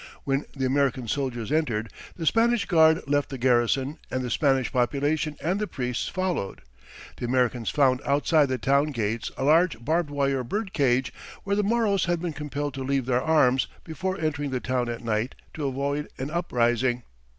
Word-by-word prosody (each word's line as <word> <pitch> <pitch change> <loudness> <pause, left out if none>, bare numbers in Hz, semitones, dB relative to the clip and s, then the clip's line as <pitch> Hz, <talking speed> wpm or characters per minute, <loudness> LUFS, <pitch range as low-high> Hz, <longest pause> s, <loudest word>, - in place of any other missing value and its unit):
When 135 +1 0
the 135 -1 -1
American 130 -2 +1
soldiers 125 -2 -2
entered, 115 -9 0 0.2
the 165 - -5
Spanish 230 +4 +3
guard 160 -1 +5
left 145 0 +1
the 135 - -5
garrison, 130 +4 +1
and 130 0 -2
the 125 - -3
Spanish 135 -3 +2
population 145 +4 0
and 185 +5 -1
the 210 - -1
priests 125 -6 -3
followed. 185 - -2 0.6
The - - -4
Americans 125 -2 +1
found 130 -3 +3
outside 145 +1 +3
the 130 - 0
town 140 +4 +2
gates 115 -1 -2
a - - -2
large 160 0 +4
barbed 165 0 +1
wire 140 -2 0
bird 200 - -3
cage, 130 - +1 0.3
where 200 0 0
the 210 - +2
Moros 210 -3 +1
had 175 -1 0
been 170 -1 -3
compelled 145 -1 -4
to 135 -1 -5
leave 135 -1 0
their 125 0 +1
arms 135 -5 +3 0.2
before 185 +4 -3
entering 145 -2 -1
the 130 -1 -2
town 125 -1 -1
at 120 0 -5
night, 115 +2 -1 0.2
to 150 -3 -3
avoid 140 +2 -2
an 135 +3 -4
uprising. 120 -7 +1
140 Hz, 180 wpm, -26 LUFS, 125-160 Hz, 0.6 s, guard